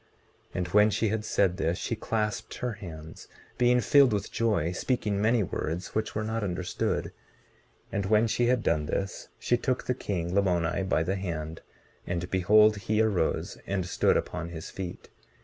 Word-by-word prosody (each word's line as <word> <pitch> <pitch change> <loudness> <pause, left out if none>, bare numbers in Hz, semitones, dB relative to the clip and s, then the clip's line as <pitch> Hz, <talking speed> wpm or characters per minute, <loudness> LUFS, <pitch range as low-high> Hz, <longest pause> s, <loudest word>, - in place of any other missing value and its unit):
19:30 - - -3
And 90 -1 -1
when 105 +4 +5
she 110 +1 0
had 110 0 -1
said 95 -4 +1
this, 85 -2 0
she 115 - -2
clasped 110 -1 -2
her 125 -1 -2
hands, 80 -6 -10 0.3
being 125 0 +4
filled 140 -3 +5
with 100 - -2
joy, 105 -8 +1
speaking 105 +1 -1
many 110 +1 +3
words 85 0 -4
which 110 0 -2
were 105 - -1
not 110 0 -2
understood; 90 -2 -2 0.8
and 100 -1 -1
when 110 +2 +4
she 120 +1 +1
had 125 -2 +2
done 75 -2 +1
this, 95 +5 -3
she 120 - +1
took 130 +1 -1
the 125 - +1
king, 90 -8 -3
Lamoni, 90 -3 +1
by 80 - +2
the 95 +4 -1
hand, 80 -4 -4 0.5
and 90 0 -3
behold 105 +3 +5
he 105 +2 -1
arose 100 -7 0
and 95 -2 -1
stood - - +2
upon 85 +2 -3
his 80 -2 -7
feet. 90 -2 -7
100 Hz, 175 wpm, -28 LUFS, 85-110 Hz, 0.8 s, when